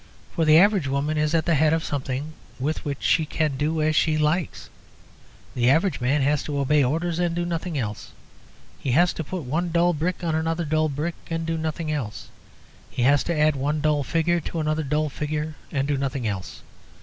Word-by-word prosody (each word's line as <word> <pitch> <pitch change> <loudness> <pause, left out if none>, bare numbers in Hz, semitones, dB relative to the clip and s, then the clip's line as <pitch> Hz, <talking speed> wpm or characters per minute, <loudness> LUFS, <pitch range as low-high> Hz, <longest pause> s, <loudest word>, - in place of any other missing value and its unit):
For 165 - +1
the 155 0 +7
average 195 -4 +4
woman 140 +3 -1
is 155 +1 +1
at 160 - +1
the 170 - +2
head 155 +1 +3
of 160 0 0
something 140 +2 -3 0.3
with 150 +5 -2
which 140 -2 -4
she 160 - +3
can 155 -2 -1
do 155 +3 0
as 155 0 +1
she 155 0 +3
likes; 155 +2 -1 0.9
the 120 0 +2
average 165 +3 +2
man 135 +3 +2
has 145 +1 +2
to 145 -2 -3
obey 140 +1 +3
orders 165 +6 -1
and 175 -1 0
do 175 0 -1
nothing 170 -1 -3
else. 105 -5 -4 0.7
He 130 - -1
has 175 +5 +4
to 160 - -4
put 175 +2 -5
one 160 +7 -1
dull 170 +1 +3
brick 170 +4 -2
on 165 -2 0
another 165 +1 -1
dull 155 +1 +1
brick, 150 +4 -2 0.2
and 165 0 -2
do 165 0 -1
nothing 160 0 -3
else; 125 -9 -4 0.6
he 125 - -2
has 140 +3 +4
to 170 -2 -1
add 150 0 +4
one 145 +3 -1
dull 150 -1 +1
figure 165 +5 +1
to 165 +1 -5
another 155 0 0
dull 150 +1 0
figure, 150 +2 -3 0.2
and 140 -1 -1
do 145 -1 0
nothing 135 -2 -2
else. 95 -3 -5
155 Hz, 210 wpm, -24 LUFS, 140-165 Hz, 0.9 s, the